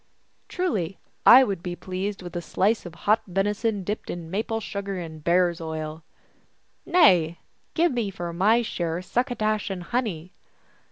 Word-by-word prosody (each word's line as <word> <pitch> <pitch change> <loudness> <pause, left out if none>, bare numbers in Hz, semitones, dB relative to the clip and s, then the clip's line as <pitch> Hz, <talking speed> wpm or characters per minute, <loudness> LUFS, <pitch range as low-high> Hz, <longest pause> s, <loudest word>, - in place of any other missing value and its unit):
" - - -43
Truly, 200 - -1 0.3
I 260 +2 +10
would 195 -8 -2
be 175 0 -4
pleased 190 +2 -4
with 175 -1 -8
a 175 - -2
slice 195 +4 0
of 170 - -11
hot 215 +2 +4
veni 195 +3 +1
son 210 -2 -1
dipped 210 +4 -4
in 165 -2 -6
maple 225 +3 -1
sugar 200 -2 -4
and 160 -3 -7
bear 175 +1 +4
s 170 - -10
oil." 160 0 -5 0.4
" - - -43
Nay, 180 - +5 0.4
give 340 0 +3
me 235 -5 -1
for 175 -3 -5
my 215 +7 +3
share 175 -4 -3
succotash 215 -2 -1
and 185 -2 -4
honey." 185 -6 -3
190 Hz, 170 wpm, -25 LUFS, 175-220 Hz, 0.4 s, I